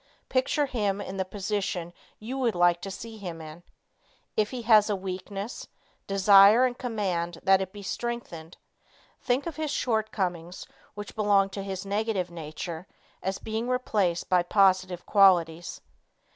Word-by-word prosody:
Picture 260 +3 +1
him 205 -7 -1
in 195 -1 -6
the 190 - 0
position 190 -3 -3 0.2
you 230 +5 -6
would 240 -5 +1
like 175 0 +3
to 195 - -5
see 220 +3 -8
him 175 -4 -6
in. 160 +1 -10 0.7
If 210 -1 +1
he 250 -2 -6
has 215 -2 +5
a 205 - +1
weakness, 195 +3 -6 0.4
desire 200 +4 +7
and 250 -1 -1
command 190 -9 -2
that 190 0 +4
it 190 -1 -4
be 205 0 -10
strengthened; 195 -6 -5 0.6
think 250 +2 0
of 335 -2 -5
his 310 -1 -2
shortcomings 195 - -2 0.3
which 205 0 -8
belong 200 -2 +3
to 195 - -5
his 195 -1 -5
negative 200 -3 -1
nature 165 +2 -7 0.3
as 190 +1 -2
being 220 +2 -4
replaced 205 -9 0
by 180 -1 +3
positive 185 -1 +2
qualities. 175 -4 +3
195 Hz, 145 wpm, -27 LUFS, 180-220 Hz, 0.7 s, desire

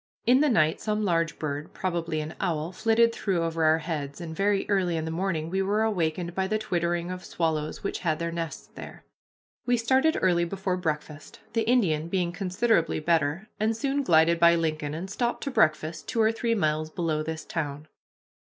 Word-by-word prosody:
In 255 +2 +5
the 300 0 +3
night 155 -10 +2
some 215 -1 -1
large 165 -3 +1
bird, 145 -1 -4
probably 170 -4 -2
an 155 +1 -6
owl, 165 -3 -1
flitted 230 +4 +3
through 185 -7 -1
over 165 0 -1
our 155 +1 +5
heads, 150 -3 -4
and 165 -2 -6
very 200 +2 +1
early 185 -4 +1
in 160 - -2
the 160 - -3
morning 165 -2 -2
we 190 +1 +1
were 205 +3 +1
awakened 175 -4 -1
by 190 +1 -1
the 215 +2 0
twittering 175 -4 -1
of 185 0 -6
swallows 155 -2 -2
which - - -2
had 160 -3 0
their 170 +1 -3
nests 165 -1 -5
there. - - -10 0.6
We 245 0 +3
started 260 +7 +2
early 175 -2 +3
before 190 +1 -2
breakfast, 155 -3 -5
the 225 0 0
Indian 165 -11 +2
being 175 -1 0
considerably 185 -1 +1
better, 160 +3 0
and 220 +1 +1
soon 275 +3 0
glided 165 - +4
by 170 0 +6
Lincoln, 155 -3 -1
and 175 +4 -5
stopped 235 +4 -2
to 275 - -3
breakfast 155 -4 +1
two 235 - -2
or 220 0 +4
three 230 0 0
miles 155 -4 0
below 160 -2 -1
this 160 0 -5
town. 150 -2 -4
170 Hz, 190 wpm, -27 LUFS, 160-205 Hz, 0.6 s, by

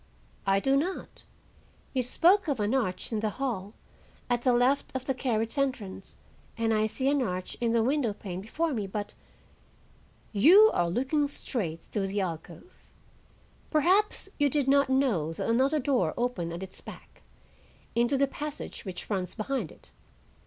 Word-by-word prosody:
"I 195 0 +4
do 270 +6 +2
not. 345 +7 -2 0.7
You 260 - +1
spoke 350 - +3
of 280 -5 0
an 210 +3 0
arch 230 -8 -1
in 220 - 0
the 215 0 0
hall, 215 -4 -4 0.6
at 240 -1 +2
the 255 - +3
left 250 +3 +2
of 260 0 -3
the 265 - 0
carriage 235 0 -1
entrance, 225 -9 -3 0.4
and 225 -1 +1
I 215 0 +2
see 260 +5 -2
an 285 0 +3
arch 185 -6 -3
in 235 -1 +2
the 230 -1 +3
window 265 -2 +1
pane 190 -3 -6
before 310 +10 -1
me, 210 -5 -2
but—" 205 +1 -5 1.2
"You 365 - +7
are 175 -1 +1
looking 270 - +1
straight 180 - -4
through 200 -2 -2
the 200 +1 -1
alcove,—perhaps 305 - -3
you 290 -1 +4
did 285 -2 0
not 280 0 +4
know 235 - +1
that - - -4
another 265 +6 +3
door 255 - +1
opened 235 -9 -1
at 170 +3 -5
its 190 0 -7
back,—into 240 +4 -5
the 275 - +4
passage 295 +2 -6
which 185 -2 -6
runs 185 -4 -2
behind 230 - -2
it. - - -17
240 Hz, 160 wpm, -28 LUFS, 200-275 Hz, 1.2 s, You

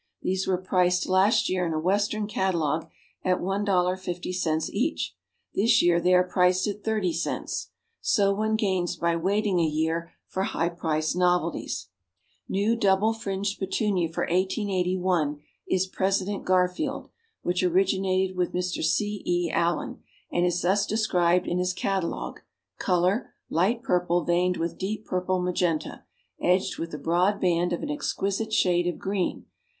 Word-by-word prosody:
These 190 +1 -1
were 185 -1 +2
priced 180 -1 +1
last 190 +3 +3
year 185 -1 0
in 165 -2 -1
a 155 - 0
Western 205 +5 +1
catalogue 170 - -1 0.3
at 185 -1 +2
$1.50 180 -4 -1
each; 250 +10 -1 0.4
this 230 +3 +4
year 175 0 +4
they 180 +1 +4
are 180 - +5
priced 180 0 +2
at 205 0 -4
30 215 -6 0
cents. 165 - -3 0.3
So 200 -3 +3
one 215 +2 0
gains 190 -5 0
by 170 0 0
waiting 195 +2 +1
a - - +3
year 160 +2 -1
for 190 - -3
high 170 -3 0
priced 160 -2 -1
novelties. 180 - 0 0.6
New 205 +4 +1
Double 205 0 +3
Fringed 200 -2 -3
Petunia 190 -3 0
for - - -2
1881, 185 -4 0 0.3
is 185 0 +2
President 195 +1 -1
Garfield, 185 +10 0 0.3
which 180 0 0
originated 190 +1 +1
with 180 -1 -1
Mr. 180 -1 -2
C. 205 +5 0
E. 175 -1 0
Allen, 170 -1 0 0.3
and 175 +1 +2
is 175 0 -1
thus 195 +3 +2
described 180 -5 +2
in 175 - 0
his 180 0 0
catalogue: 185 -1 -2 0.4
"Color, 185 +5 +1 0.2
light 215 +9 +1
purple 175 -2 +1
veined 180 +2 +1
with 165 0 -3
deep 215 +3 -3
purple 185 0 -1
magenta, 180 -3 -1 0.4
edged 180 +1 +1
with 165 0 -4
a - - -4
broad 175 +7 +1
band 175 -1 +1
of 175 - -2
an 295 - -2
exquisite 220 -7 -2
shade 175 -4 +2
of 175 - -2
green. 195 -1 -2
185 Hz, 145 wpm, -26 LUFS, 175-195 Hz, 0.6 s, are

